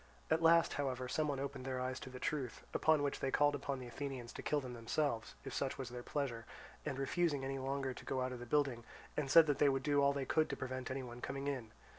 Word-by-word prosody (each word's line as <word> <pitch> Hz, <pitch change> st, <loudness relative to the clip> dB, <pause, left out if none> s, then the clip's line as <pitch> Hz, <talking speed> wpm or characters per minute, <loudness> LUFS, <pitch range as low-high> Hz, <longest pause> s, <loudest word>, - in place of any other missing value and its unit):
At 160 Hz, +1 st, +4 dB
last, 165 Hz, 0 st, +6 dB
however, 130 Hz, -3 st, -1 dB
someone 145 Hz, 0 st, 0 dB
opened 140 Hz, -1 st, -4 dB
their 130 Hz, -1 st, -2 dB
eyes 130 Hz, +1 st, -2 dB
to -, -, -8 dB
the 130 Hz, -, -8 dB
truth, 135 Hz, -5 st, -2 dB
upon 155 Hz, -2 st, +4 dB
which 140 Hz, -, -1 dB
they 135 Hz, -, 0 dB
called 145 Hz, +2 st, +4 dB
upon 140 Hz, -1 st, -2 dB
the 130 Hz, -, -7 dB
Athenians 125 Hz, -1 st, -5 dB
to -, -, -6 dB
kill 150 Hz, -, +1 dB
them 130 Hz, -3 st, -6 dB
themselves, 115 Hz, 0 st, -1 dB
if 135 Hz, -, -5 dB
such 135 Hz, -1 st, -1 dB
was 130 Hz, -2 st, -4 dB
their 125 Hz, 0 st, -6 dB
pleasure, 120 Hz, -4 st, -3 dB, 0.4 s
and 140 Hz, -3 st, -3 dB
refused 155 Hz, +3 st, +1 dB
any 135 Hz, 0 st, -3 dB
longer 135 Hz, 0 st, -1 dB
to -, -, -11 dB
go 130 Hz, -, -1 dB
out 130 Hz, 0 st, -1 dB
of 125 Hz, -, -5 dB
the 120 Hz, -, -8 dB
building, 135 Hz, -3 st, +1 dB, 0.3 s
and 145 Hz, -2 st, -1 dB
said 165 Hz, +3 st, +9 dB
they 145 Hz, -1 st, +4 dB
would 135 Hz, -1 st, 0 dB
do 145 Hz, -1 st, +3 dB
all 140 Hz, 0 st, +5 dB
they 140 Hz, -1 st, -2 dB
could 155 Hz, +3 st, +2 dB
to -, -, -3 dB
prevent 130 Hz, 0 st, -4 dB
any 130 Hz, 0 st, -3 dB
one 120 Hz, 0 st, -8 dB
coming 135 Hz, +2 st, -3 dB
in. 130 Hz, -6 st, -2 dB
135 Hz, 250 wpm, -37 LUFS, 130-145 Hz, 0.4 s, said